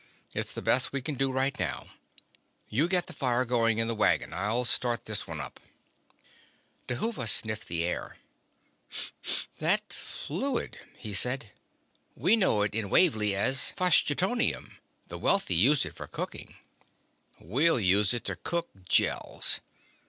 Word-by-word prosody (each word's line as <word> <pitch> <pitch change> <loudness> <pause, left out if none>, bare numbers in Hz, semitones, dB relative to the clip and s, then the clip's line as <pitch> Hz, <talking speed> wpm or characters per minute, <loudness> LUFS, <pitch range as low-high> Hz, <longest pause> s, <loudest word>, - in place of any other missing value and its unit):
It's - - -3
the - - -8
best 130 - +2
we 140 -2 -4
can 150 - -3
do 135 0 -1
right 135 +2 -1
now. - - -4 0.8
You 145 +10 0
get 180 -1 0
the 180 - -11
fire 130 -3 -1
going 115 -2 0
in 115 0 0
the 115 - -1
wagon; 110 - 0
I'll 110 +6 -1
start 120 0 0
this 110 -2 -1
one - - -7
up." - - -9 1.3
Dhuva 125 - -1
sniffed 110 0 +4
the 85 -1 -2
air. 90 - -5 1.4
"That - - +3
fluid," 235 - -5 0.2
he 110 -4 -8
said. 125 +1 +4 0.6
"We 220 - +3
know 185 - +2
it 105 - -3
in 110 -2 -3
Wavly 110 - +3
as 130 +7 +3
phlogistoneum. 185 - +2 0.3
The - - -10
wealthy 195 - +1
use 130 - +3
it - - -8
for - - -10
cooking." - - -8 0.8
"We'll 135 - +1
use 100 0 +2
it 120 - -3
to - - -1
cook 170 -1 -4 0.2
Gels." - - +2
125 Hz, 145 wpm, -27 LUFS, 110-155 Hz, 1.4 s, sniffed